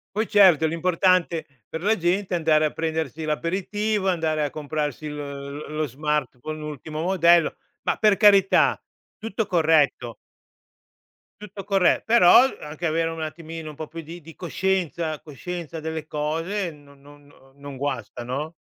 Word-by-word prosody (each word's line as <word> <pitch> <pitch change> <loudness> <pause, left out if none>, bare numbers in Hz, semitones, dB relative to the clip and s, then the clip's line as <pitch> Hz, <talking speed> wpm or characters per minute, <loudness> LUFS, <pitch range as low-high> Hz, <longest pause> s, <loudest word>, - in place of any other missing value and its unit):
Poi 215 +1 0
certo 185 -7 +5
l'importante 170 0 +1 0.2
per 160 +1 -6
la 215 +3 +3
gente 185 +1 -1
è - - +2
andare 155 -2 +3
a 150 - 0
prendersi 160 -1 -3
l'aperitivo, 195 +6 -1
andare 160 -3 0
a 145 - -1
comprarsi 150 +1 -4
l 150 - -5
lo 140 0 -7
lo 155 0 -2
smartphone, 150 +1 -3
l'ultimo 155 0 -6
modello, 170 -2 +4 0.3
ma - - 0
per 210 -3 +3
carità 200 -3 +5 0.4
tutto 220 0 -3
corretto 155 - +2 1.3
tutto 205 -1 -8
corre 195 -2 +2
però 225 0 +7 0.2
anche 150 +3 -6
avere 165 0 +1
un 165 0 -6
attimino 160 0 -6
un 150 - -11
po' 155 - -6
più 165 +2 -8
di 165 +2 -10
di 165 -1 -14
coscienza, 175 -3 -2
coscienza 165 +2 -7
delle 160 0 -5
cose, 165 +6 -2
non 145 -2 -18
non 145 0 -18 0.2
non 140 -1 -9
guasta, 125 -4 -4
no? 145 +7 -4
160 Hz, 150 wpm, -24 LUFS, 150-180 Hz, 1.3 s, però